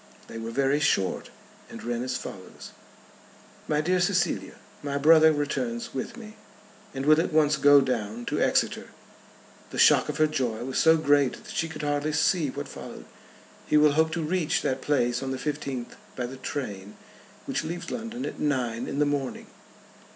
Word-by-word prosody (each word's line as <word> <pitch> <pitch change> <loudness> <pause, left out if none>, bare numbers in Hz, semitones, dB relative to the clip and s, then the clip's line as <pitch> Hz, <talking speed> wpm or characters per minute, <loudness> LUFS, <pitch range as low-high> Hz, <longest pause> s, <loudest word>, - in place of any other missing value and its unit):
They 115 - -8
were 115 0 -5
very 135 +4 +1
short, 95 -10 0 0.4
and - - -9
ran 120 0 -2
as 130 0 -2
follows: 95 -1 -10 1.0
"My 150 0 +1
dear 180 +3 +1
Cecilia, 180 0 0 0.3
my 140 -1 -2
brother 160 +2 +6
returns 235 - -2
with 235 - -5
me, 215 -2 -11 0.5
and 135 0 -4
will 155 +2 +6
at - - -3
once 150 -1 +3
go 145 0 +6
down 120 -3 -3
to - - -1
Exeter." - - +1 0.8
The - - -8
shock - - +5
of - - -3
her 155 - +4
joy 125 -7 -2
was 130 - -2
so 160 0 +5
great 145 -3 +3
that - - -9
she 165 - -1
could 160 - -7
hardly 145 +1 -1
see 160 0 +2
what - - -6
followed. - - -10 0.6
"He 150 - +3
will 150 0 +6
hope 160 +2 +2
to 170 -1 -2
reach 165 0 0
that 130 0 -1
place 125 -4 +1
on 135 - -4
the 130 - -2
fifteenth 140 -4 -4 0.2
by 125 - -3
the 130 +2 -8
train 105 -8 -6 0.5
which - - -2
leaves 170 +2 -5
London 235 +2 -5
at - - -6
nine 125 -5 -1
in - - -4
the 150 - +3
morning." 140 -3 -2
145 Hz, 180 wpm, -26 LUFS, 130-160 Hz, 1.0 s, brother